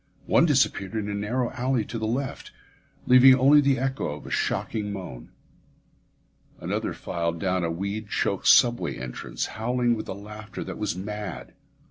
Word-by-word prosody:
One - - +4
disappeared 95 +3 +1
in 105 -2 -2
a - - -3
narrow 115 +5 -1
alley 125 -3 -1
to 115 - -5
the 110 - -2
left, 130 +4 -3 0.6
leaving 130 +1 +8
only 140 +3 +6
the 140 -1 +2
echo 135 +1 -2
of 75 - -12
a - - -9
shocking 105 -2 -1
moan. 90 -12 -8 1.3
Another - - -2
filed 85 -1 -3
down 95 -1 0
a 85 - 0
weed 100 +5 -4
choked - - -1
subway 120 0 +4
entrance, 65 -1 -5 0.2
howling 120 +1 +1
with 110 - -6
a - - -2
laughter 105 +1 -8
that - - -7
was 105 -4 -2
mad. 100 -10 -6
110 Hz, 160 wpm, -25 LUFS, 95-125 Hz, 1.3 s, leaving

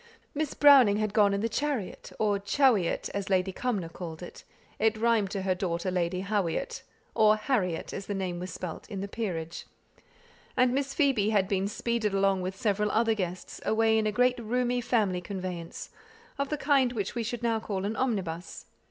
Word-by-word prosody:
Miss 300 0 -2
Browning 265 -8 +7
had 215 -1 -1
gone 205 -2 +4
in 200 0 0
the 225 - +1
chariot 260 -4 -3
(or 205 -2 +1
"chawyot," 210 -3 +2
as 200 -1 -3
Lady 190 0 +2
Cumnor 205 -4 -2
called 165 -1 -8
it; - - -10 0.4
it 220 0 +2
rhymed 225 -3 +2
to 195 -1 -3
her 190 -1 +2
daughter, 180 0 -2
Lady 180 0 -1
Hawyot 200 -5 -1 0.3
or 215 -1 +5
Harriet, 215 -7 -1
as 195 - -6
the 205 - -2
name 185 -2 -3
was 180 0 -5
spelt 170 -1 -7
in 195 -2 -5
the 200 - -3
Peerage), 175 -7 -4 0.9
and 250 -1 +4
Miss 275 0 -1
Phoebe 265 -9 +2
had 200 -3 +2
been 195 0 0
speeded 215 -1 -1
along 195 -1 +2
with 185 +1 -3
several 210 +1 0
other 225 +1 +2
guests, 185 -3 -5
away 220 0 +3
in 220 -1 +2
a - - +1
great 250 +3 +2
roomy 245 +2 0
family 205 -7 +1
conveyance, 180 -2 -6 0.5
of 280 0 -1
the 300 - -1
kind 275 -3 +2
which 205 -5 -3
we 240 - -2
should 240 +2 -4
now 230 -1 +1
call 195 -3 -3
an 215 +2 -2
"omnibus." 185 -10 -3
210 Hz, 185 wpm, -28 LUFS, 185-235 Hz, 0.9 s, Browning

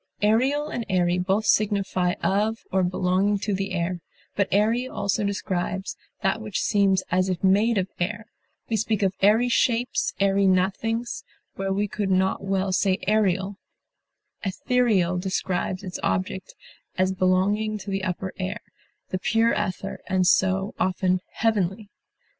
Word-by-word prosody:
Aerial 260 +8 +2
and 240 -6 -3
airy 180 -1 +2
both 195 +4 0
signify 195 -4 +2
of 215 +3 0
or 190 - +2
belonging 185 +3 +1
to 205 +1 -2
the 195 +1 -2
air, 175 0 -1 0.4
but 200 -1 +1
airy 225 +5 +2
also 210 -2 -1
describes 190 -1 -2 0.3
that 195 +4 +1
which 210 -3 -3
seems 195 -2 +2
as 185 +1 +2
if 180 -1 -3
made 205 +4 +3
of 190 -1 +1
air; 210 +5 -2 0.4
we 225 - 0
speak 215 0 0
of 190 -1 +2
airy 215 +5 +4
shapes, 245 0 +1
airy 195 0 +3
nothings, 205 +6 0 0.3
where 195 0 -3
we 205 +2 0
could 205 0 -3
not 190 +1 +1
well 195 0 0
say 190 0 +2
aerial; 200 -2 +1 0.9
ethereal 195 -3 +1
describes 185 0 -2
its 185 -2 -5
object 185 0 -2 0.4
as 185 0 +2
belonging 195 +4 +1
to 200 0 -7
the 195 0 -2
upper 185 0 -3
air, 195 +4 -3 0.5
the 185 - -2
pure 225 +4 +2
ether, 185 +1 -3
and 185 -1 +1
so, 190 +2 +2
often, 185 0 +1
heavenly. 205 -2 0
195 Hz, 145 wpm, -25 LUFS, 185-215 Hz, 0.9 s, airy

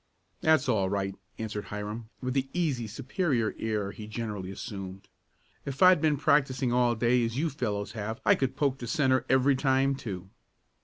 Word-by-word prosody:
"That's 155 -4 +3
all 95 -3 +2
right," 95 -1 -1 0.2
answered 105 -2 -4
Hiram 105 +2 -6
with 130 -1 -2
the 135 0 0
easy 145 -10 0
superior 130 - -1
air 105 -3 -1
he 105 +1 -9
generally 105 -4 -4
assumed. 95 -1 -7 0.6
"If 135 +2 -1
I'd 185 -4 +7
been 155 -2 +3
practicing 135 -3 +2
all 120 -1 +3
day 120 +2 +2
as 115 +1 -2
you 160 +3 0
fellows 105 -7 -3
have 110 +1 -4
I - - +7
could 135 -2 -1
poke 135 -2 0
the 120 - -6
centre 130 -4 +2
every 130 +1 +4
time, 135 0 +2
too." 95 -8 -6
120 Hz, 170 wpm, -29 LUFS, 105-135 Hz, 0.6 s, I'd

